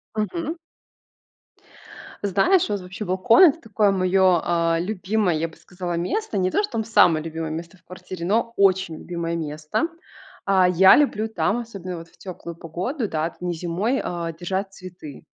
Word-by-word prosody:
Мгм. 315 - -2 1.7
Знаешь, 205 - +3
вот 205 -2 -2
вообще 185 +4 -7
балкон- 195 - +5
это 330 -2 +6
такое 215 -2 +1
моё, 185 -2 +3
а, 170 -1 +1
любимое, 190 0 0
я 160 +2 -1
бы 160 - -16
сказала, 180 -1 -6
место. 195 - -2
Не 185 -1 +1
то, - - +2
что 415 - -5
там 220 - 0
самое 175 -8 +4
любимое 160 -1 -4
место 170 +3 -7
в - - -31
квартире, 185 -1 -8
но 230 +5 +1
очень 190 -4 +2
любимое 170 -1 -4
место. 155 - -2 0.6
А, 190 -2 +4
я 190 +2 +7
люблю 220 -7 +2
там, 220 0 0
особенно 195 -6 -7
вот 165 0 -10
в - - -26
тёплую 170 -2 -8
погоду, 185 - -4
да, 155 0 -1
это 170 - -12
не 180 -1 -2
зимой, 180 +9 -1
э, 170 -1 -4
держать 190 +2 -3
цветы. 180 -7 -11
185 Hz, 170 wpm, -23 LUFS, 170-210 Hz, 1.7 s, я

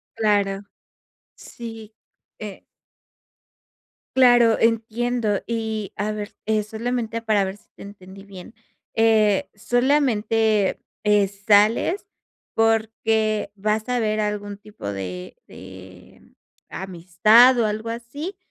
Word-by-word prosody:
Claro, 205 -3 +1 0.7
sí, 225 -2 -10 0.4
eh. 210 -3 -8 1.6
Claro, 245 -3 +5
entiendo 230 -1 0
y 220 -3 -3
a 210 +1 -2
ver, 210 0 -6
eh, 215 -1 +1
solamente 230 +1 -3
para 215 -3 +2
ver 190 +1 -5
si - - -28
te - - -15
entendí 195 -1 -12
bien. 195 +1 -12 0.4
Eh, 220 +2 +3
solamente, 225 -3 +1 0.2
eh, 210 -1 +3
sales 210 - +2 0.5
porque, 220 -1 +1
vas 215 +3 -1
a 250 0 +1
ver 215 -1 0
algún 205 -1 -3
tipo 205 - -10
de 90 -2 -6
de, 95 -1 -14 0.4
amistad 190 +7 +4
o 230 - +3
algo 215 +2 -3
así, 280 - -6
215 Hz, 105 wpm, -22 LUFS, 200-230 Hz, 1.6 s, Claro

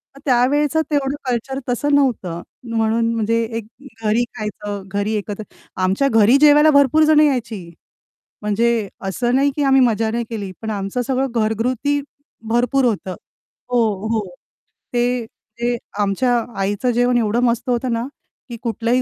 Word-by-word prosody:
मग - - -13
त्यावेळचं 290 +4 +2
तेवढं 280 -1 0
कल्चर 265 +3 -2
तसं 285 +4 +1
नव्हतं, 200 -11 0 0.3
म्हणून 230 +1 +1
म्हणजे 230 +1 +1 0.2
एक 220 - -5 0.4
घरी 220 +3 +2
खायचं, 210 -1 -5
घरी 205 +2 -2
एकत्र 210 +1 -4 0.4
आमच्या 195 +9 +2
घरी 225 +4 +5
जेवायला 295 +1 +7
भरपूर 280 +2 +5
जण 310 -1 +5
यायची. 230 - 0 0.7
म्हणजे 220 0 +1 0.2
असं 240 +6 0
नाही 280 +1 +3
की 295 - 0
आम्ही 270 -1 +5
मजा 225 -2 +2
नाही 235 +1 -1
केली, 205 -4 -5
पण 220 - -4
आमचं 200 +4 -2
सगळं 265 0 +1
घरगुती 235 +6 0 0.5
भरपूर 245 +3 +2
होतं 195 -5 -1 0.6
हो, 245 -1 +3 0.3
हो. 220 -1 0 0.7
ते 245 0 0
ते 235 +2 -5 0.2
आमच्या 205 +5 +1 0.3
आईचं 205 +6 0
जेवण 245 +1 +2
एवढं 225 0 +1
मस्त 240 +2 0
होतं 245 0 0
ना, 230 +3 -2 0.4
की 235 - -6
कुठलाही 235 +2 0
235 Hz, 145 wpm, -20 LUFS, 215-260 Hz, 0.7 s, जेवायला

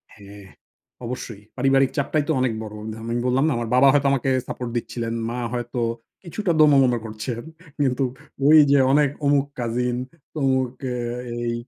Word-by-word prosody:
হ্যাঁ, 100 -1 -13 0.6
অবশ্যই। 115 -3 -6 0.2
পারিবারিক 135 0 +3
চাপটাই 145 +1 +1
তো - - +1
অনেক 125 -3 +1
বড়। 105 -1 -8 0.2
ধা - - -9
আমি 115 +1 -3
বললাম 130 +2 +2
না? - - +2
আমার 115 -1 -3
বাবা 135 +2 +6
হয়তো 145 -1 +3
আমাকে 135 -1 0 0.2
সাপোর্ট 125 -1 -5
দিচ্ছিলেন। 115 0 -4 0.2
মা 120 +1 -4
হয়তো 120 0 -3 0.4
কিছুটা 180 +2 -2
দোনোমোনো 135 -5 +5
করছেন। 115 +2 -5 0.4
কিন্তু 130 +1 0 0.4
ওইযে 145 -2 +7
অনেক 145 0 +4 0.2
অমুক 140 -1 +3
কাজিন 120 +1 -1 0.4
তমুক 130 -3 +1 0.2
এ - - -3 0.4
এই, 120 0 -2
125 Hz, 155 wpm, -23 LUFS, 120-140 Hz, 0.6 s, ওইযে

